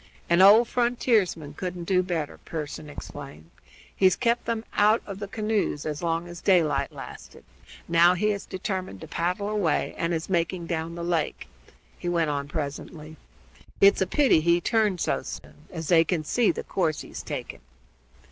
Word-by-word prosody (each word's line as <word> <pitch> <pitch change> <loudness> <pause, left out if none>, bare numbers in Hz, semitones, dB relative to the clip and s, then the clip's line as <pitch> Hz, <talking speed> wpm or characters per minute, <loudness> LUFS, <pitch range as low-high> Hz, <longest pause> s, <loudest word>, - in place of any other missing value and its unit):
"An 170 +2 +5
old 215 +5 +8
frontiersman 225 - +1
couldn't 180 +2 -5
do 180 +1 +2
better," 170 -5 -3
Pearson 155 -1 -6
exclaimed. 140 - -10 0.4
"He's 185 -2 +4
kept 235 -1 0
them 230 -1 -2
out 215 +2 +3
of 200 -1 -7
the 205 - -5
canoe 215 0 0
as 150 0 -5
long 170 0 -1
as 175 -1 -9
daylight 150 -7 +2
lasted; - - -11 0.4
now 170 +2 +5
he 210 +4 +1
has 200 -1 -5
determined 185 - -4
to - - -8
paddle 180 +4 -2
away 205 -7 0
and 170 - 0
is 165 -1 -2
making 175 -1 -1
down 165 0 -3
the 170 - -5
lake," 170 -3 -1 0.5
he 175 - -3
went 165 -3 +1
on 140 -1 -3
presently. 155 +1 -6 0.6
"It's 200 0 +6
a 190 - +2
pity 265 - +4
he 170 +2 +3
turned 210 0 +1
so - - 0
soon, - - -10
as 165 -3 -6
they 165 -2 +6
can 165 -2 -1
see 230 +8 +2
the - - -5
course 165 -5 -1
he's - - -8
taking." - - -6
175 Hz, 170 wpm, -26 LUFS, 160-200 Hz, 0.6 s, old